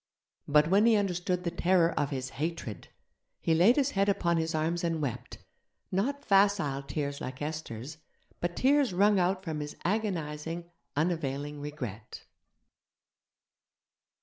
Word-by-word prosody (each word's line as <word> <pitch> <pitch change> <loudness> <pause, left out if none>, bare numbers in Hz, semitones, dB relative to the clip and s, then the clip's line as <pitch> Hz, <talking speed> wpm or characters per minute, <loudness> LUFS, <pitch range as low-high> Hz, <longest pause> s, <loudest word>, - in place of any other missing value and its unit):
But 150 +1 +5
when 200 +6 +4
he 230 - +6
understood 180 -3 0
the 170 - -1
terror 175 -1 +3
of 145 - -1
his 130 -2 -3
Hatred, 155 - -4 0.5
he 165 - +1
laid 180 +10 +6
his 285 -1 +2
head 195 0 +2
upon 170 -3 +1
his 160 0 -1
arms 165 +2 0
and 165 -2 0
wept, 125 -5 -4 0.5
not 270 +10 -1
facile 195 -9 +3
tears 140 0 -4
like 130 0 -6
Esther's, 150 -2 -5 0.4
but 175 0 -2
tears 275 -4 +3
wrung 200 +2 +4
out 185 +1 +1
from 160 -4 -3
his 150 0 -5
agonizing, 170 -4 -2 0.2
unavailing 145 -2 -1
regret. 125 -8 -7
165 Hz, 135 wpm, -30 LUFS, 150-195 Hz, 0.5 s, he